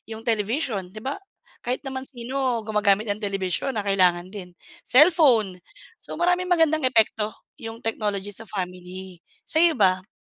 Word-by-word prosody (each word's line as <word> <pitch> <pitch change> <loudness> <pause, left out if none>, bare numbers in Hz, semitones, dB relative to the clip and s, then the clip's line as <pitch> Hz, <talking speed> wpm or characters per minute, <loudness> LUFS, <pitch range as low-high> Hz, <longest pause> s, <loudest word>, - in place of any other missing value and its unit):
yung 220 0 -7
television, 220 - -1
di 215 - -7
ba, 270 +2 -3 0.5
kahit 250 +3 -2
naman 265 -1 -4
sino 255 -1 -2
gumagamit 210 0 +2
ng 205 - -1
television 195 +6 -1
na 210 - 0
kailangan 180 -2 +2
din. 180 -4 -9 0.3
Cellphone. 255 - +5 0.4
So, - - -7
maraming 360 +1 +2
magandang 315 -4 +3
epekto, 220 -3 +2 0.3
yung 225 +1 -7
technology 205 -3 -2
sa 225 +3 -6
family. 185 -1 -7 0.3
Sa'yo, 325 0 +3
ba? 185 -1 +3
220 Hz, 140 wpm, -24 LUFS, 195-265 Hz, 0.5 s, Cellphone